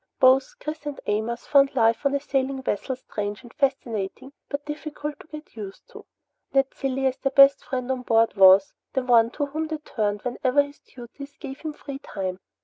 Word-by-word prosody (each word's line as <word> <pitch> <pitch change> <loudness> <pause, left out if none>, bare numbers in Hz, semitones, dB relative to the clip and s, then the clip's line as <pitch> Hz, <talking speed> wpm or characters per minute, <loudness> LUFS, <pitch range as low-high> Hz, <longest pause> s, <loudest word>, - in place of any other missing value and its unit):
Both 260 +1 +5
Chris 305 -1 -6
and 290 - -5
Amos 220 +3 -2
found 275 -1 +4
life 230 +3 +3
on 280 - 0
a - - +1
sailing 270 -1 -1
vessel 260 +3 -2
strange 210 -3 -5
and 240 - -14
fascinating 260 -2 -2 0.2
but 285 0 -4
difficult 300 0 -6
to - - -14
get 305 -4 -11
used 200 -3 -9
to. - - -13 0.5
Ned 270 0 +2
Cilley 270 0 -2
as 260 0 +1
their 270 - 0
best 275 0 +7
friend 255 0 -3
on 260 -1 -2
board 230 -2 +2
was 190 0 +7 0.2
the 265 - 0
one 235 -2 +5
to 290 - -1
whom 310 +3 -3
they 315 0 -3
turned 210 -8 -2
whenever 255 +3 +2
his 285 0 -13
duties 280 +4 -12
gave 270 +1 -8
him 310 -1 -4
free 280 -2 -8
time. 190 -8 -5
265 Hz, 195 wpm, -25 LUFS, 230-285 Hz, 0.5 s, best